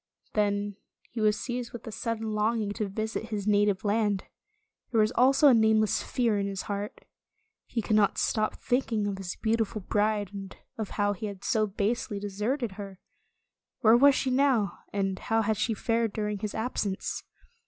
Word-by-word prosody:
Then 205 -1 0 0.3
he 230 - -4
was 210 0 +3
seized 245 -1 -4
with 240 - -8
a 225 - -6
sudden 225 0 -3
long 215 +2 +1
ing 205 -2 -2
to 210 0 -2
visit 220 +3 -3
his 210 -3 -3
native 205 -2 +2
land. 205 -2 +1 0.7
There 230 - +1
was 215 +1 +4
also 265 +4 +5
a 270 - +8
nameless 220 -1 +3
fear 230 -5 0
in 200 - -1
his 195 -1 -4
heart. 205 0 -5 0.6
He 230 -3 -2
could 215 - +1
not 210 -2 +3
stop 215 -1 +1
thinking 240 -4 0
of 200 -1 -3
his 180 -2 -5
beautiful 220 -1 -1
bride, 205 0 0
and 195 -2 -8 0.2
of 220 -3 -4
how 205 0 +2
he 210 +2 -5
had 200 -1 -8
so 215 -1 +2
basely 210 +1 -1
de 205 0 -4
serted 215 +2 -2
her. 195 -2 -7 0.8
Where 225 -1 +7
was 275 +3 +6
she 260 - 0
now, 255 -6 +2
and 195 -2 -1
how 225 0 +1
had 215 +1 +1
she 225 +2 0
fared 230 0 0
during 210 -1 -2
his 210 +1 -4
absence 220 -4 -2
215 Hz, 185 wpm, -28 LUFS, 205-230 Hz, 0.8 s, a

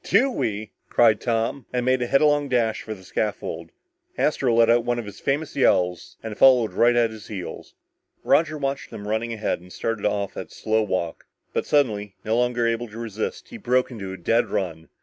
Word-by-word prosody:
"Do 270 +2 +3
we!" 110 - -3 0.2
cried 110 -3 +4
Tom, 115 +2 -1
and 125 -1 -1
made 130 0 +2
a 120 - 0
headlong 145 +1 +3
dash 115 -3 +1
for 110 - -6
the 95 - -15
scaffold. 105 +3 -3 0.5
Astro 135 -4 +1
let 115 0 +5
out 120 +1 +4
one 120 0 0
of 120 - -4
his 100 -1 -10
famous 145 +3 -1
yells 90 -9 +1
and 110 -1 -5
followed 125 -3 +5
right 120 +1 +4
at 115 -2 +3
his 110 -2 -11
heels. 95 -5 -7 0.5
Roger 155 -1 +3
watched 140 -1 -3
them 105 -1 -8
running 110 +2 -1
ahead 110 -5 -2
and 90 0 -15
started 115 0 -2
off 100 -1 -2
at - - -5
a - - -36
slow 110 0 0
walk, 95 -5 -3 0.3
but - - -1
suddenly, 105 -8 +1
no 110 +1 +1
longer 120 0 +1
able 115 +1 0
to 110 +1 -11
resist, 110 -2 -4
he 240 - -8
broke 130 - +1
into 100 -6 -6
a 95 - -6
dead 115 +7 +1
run. 85 -6 -3
115 Hz, 205 wpm, -24 LUFS, 105-125 Hz, 0.5 s, let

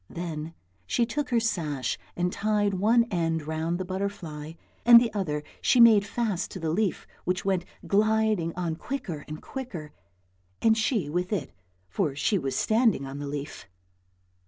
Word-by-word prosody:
Then 165 -2 -5 0.3
she 235 - +2
took 295 +5 -3
her 240 -2 +3
sash 165 - -1 0.2
and 180 0 0
tied 210 -1 +1
one 220 +5 +4
end 165 -3 0
round 160 +2 -1
the 185 - -4
butterfly, 180 -5 -4 0.3
and 235 0 +10
the 235 -2 -1
other 150 -8 -2 0.2
she 250 - +3
made 220 -3 +7
fast 215 -6 -1
to 190 - -7
the 160 -2 -1
leaf 200 +3 0 0.2
which 185 +1 -1
went 190 -3 +1 0.2
gliding 215 -4 +2
on 170 -3 -2
quicker 180 - -5
and 155 0 -7
quicker, 195 - -6 0.7
and 225 -1 +4
she 220 - 0
with 180 +5 -2
it 205 - -2 0.4
for 155 - -1
she 195 +7 +1
was 135 -3 -3
standing 220 - +2
on 135 +1 -6
the 145 - -4
leaf. 145 -5 -6
185 Hz, 160 wpm, -27 LUFS, 160-220 Hz, 0.7 s, and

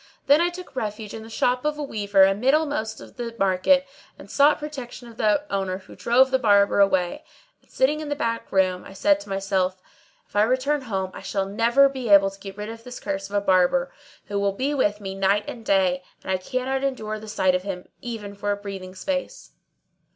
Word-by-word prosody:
Then 290 +3 +5
I 345 - +3
took 355 -4 -10
refuge 210 -3 -4
in 225 - -6
the 220 - -11
shop 250 +2 0
of 300 0 -1
a 300 - -3
weaver 205 -7 +2
amiddlemost 245 +2 +1
of - - -14
the 235 -1 -5
market 195 +9 +3 0.3
and - - -13
sought 290 +1 +5
protection 260 -5 -8
of 230 -1 -14
the 220 +7 +2
owner 190 -1 -1
who 190 - -14
drove 260 +3 +3
the 260 - +3
Barber 205 -4 +4
away; 190 -3 +2 0.4
and, - - -32
sitting 290 +4 +1
in 305 -1 -5
the 290 - -1
back 230 -5 -3
room,[FN#630] 185 -1 +1
I - - -11
said 200 0 +3
to 200 0 -12
myself, 195 -1 -1 0.5
"If - - -23
I 205 - +4
return 260 +6 +1
home 190 -6 -3
I - - -9
shall 195 0 -2
never 230 +7 +4
be 260 -4 -5
able 195 -1 +6
to 195 - -15
get 195 0 -9
rid 210 +1 -5
of 225 0 -9
this 250 +1 -8
curse 195 0 -4
of 205 - -6
a 205 - +2
Barber, 190 +8 +2 0.3
who 205 -1 -2
will 200 -1 +1
be 270 +8 -1
with 210 -7 0
me 195 -1 -5
night 195 +2 +1
and 230 - -7
day; 190 -3 +2 0.2
and - - -3
I 190 - +2
cannot 255 +7 -2
endure 215 -6 -2
the 215 - -11
sight 190 -3 +1
of 180 - +1
him 185 -2 -6
even 220 -4 -6
for 205 +1 -2
a 205 - -1
breathing 195 -2 -8
space." 285 - -4
210 Hz, 220 wpm, -24 LUFS, 195-260 Hz, 0.5 s, able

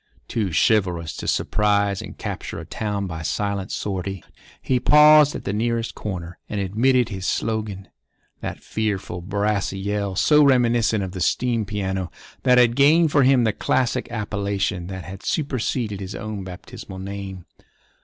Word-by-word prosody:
Too 105 -5 -1
chivalrous 90 -4 +1
to - - -6
surprise 100 -2 +1
and - - -9
capture - - -5
a - - -7
town 105 -2 -3
by 80 -3 -5
silent 100 +3 -2
sortie, 95 -2 -3 0.4
he 130 -1 0
paused 150 +2 +6
at - - -6
the 100 - -2
nearest 115 +1 -1
corner 90 -4 -6
and 105 - -2
emitted 120 +5 +2
his 95 -3 -4
slogan—that 105 -4 -5
fearful, 100 -5 -3
brassy 100 +1 -1
yell, 100 0 -2
so 150 +9 +5
reminiscent 120 -5 +3
of 95 - -4
the 90 -1 -6
steam 120 +3 +1
piano, 95 -3 -3 0.3
that 125 -1 +4
had 120 -1 +5
gained 155 +4 +5
for 145 - +4
him 130 -1 +5
the 110 -2 +2
classic 130 +3 0
appellation 100 -4 -2
that 95 -1 -6
had 95 0 -9
superseded 125 - -2
his 95 0 -6
own 110 -3 -5
baptismal 95 +1 -9
name. 95 -1 -7
105 Hz, 150 wpm, -23 LUFS, 95-120 Hz, 0.4 s, paused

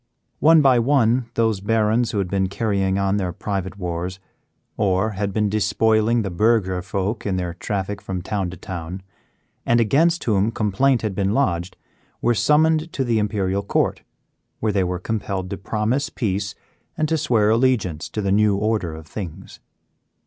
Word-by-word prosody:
One 160 0 +6
by 130 -3 +5
one 120 -1 +2
those 115 -3 +1
barons 110 +2 +1
who - - -3
had 100 -2 0
been 95 0 0
carrying 100 -2 0
on 100 0 +1
their 95 -3 -1
private 95 +1 -4
wars, 90 0 -4 0.6
or 100 0 +1
had 100 0 -2
been 105 +1 +1
despoiling 110 +2 +2
the 100 - -4
burgher 95 -1 +2
folk 100 +4 -3
in 100 -2 -1
their 90 -2 -2
traffic 100 +2 -4
from 90 -2 -5
town 95 -2 -2
to 90 - -9
town, 90 +1 -7 0.6
and 120 0 +3
against 160 +10 +2
whom 105 -1 +2
complaint 115 +4 +1
had 105 -3 -1
been 100 +2 0
lodged, 90 -10 0 0.4
were 120 - +2
summoned 155 +6 +2
to 135 - -1
the 115 -3 +1
Imperial 100 -2 0
Court, 100 - 0 0.6
where 110 - 0
they 95 -2 +1
were 90 0 -2
compelled 95 -1 -3
to 100 - -3
promise 115 +8 -1
peace 100 -6 -2 0.4
and 155 - +1
to 160 - +1
swear 110 -8 +2
allegiance 110 -10 +1
to 105 - -4
the 100 - 0
new 105 0 +3
order 105 -6 -1
of 80 0 -10
things. 95 -1 -8
105 Hz, 170 wpm, -22 LUFS, 95-115 Hz, 0.6 s, One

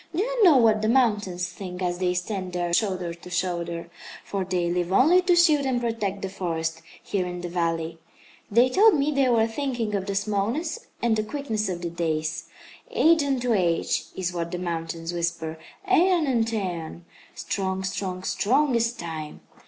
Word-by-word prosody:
Do 370 - +2
you - - 0
know 335 -8 +7
what 220 -3 +4
the 215 - +1
mountains 210 -8 +1
think, 185 -2 -7
as 175 0 -1
they 180 -1 +1
stand 185 0 -3
there 175 -1 -1
shoulder 185 -4 0
to 170 +1 -12
shoulder 170 -1 -2 0.3
for 195 -1 -2
they 180 -1 -1
live 175 +1 -1
only 320 - +5
to 360 -1 +3
shield 315 -4 +5
and 260 -2 0
protect 220 -5 -2
the - - -1
forest, 165 -3 -3 0.2
here 185 -3 -1
in 180 0 -5
the 175 - -5
valley. 165 -1 -2 0.5
They 235 +4 +5
told 405 - +5
me 290 +1 +1
they 275 -3 +2
were 230 -2 +4
thinking 235 -2 -2
of 195 -1 -2
the 200 - -2
smallness 215 - -1 0.2
and 235 -2 +3
the 215 - 0
quickness 220 -4 -2
of 175 -1 -4
the 170 - -3
days. 160 -1 -2 0.4
'Age 325 0 +4
unto 255 -4 0
age!' 175 -5 +1
is 185 -1 -2
what 170 -1 -3
the 180 - -4
mountains 165 -1 -4
whisper. 165 -2 -3 0.3
'Æon 365 -4 +4
unto 230 -3 +1
æon! 175 -4 -4 0.3
Strong, 190 -1 -2
strong, 185 -1 -3
strong 265 +9 +2
is 230 0 +1
Time!' 160 -6 -7
195 Hz, 180 wpm, -25 LUFS, 175-245 Hz, 0.5 s, know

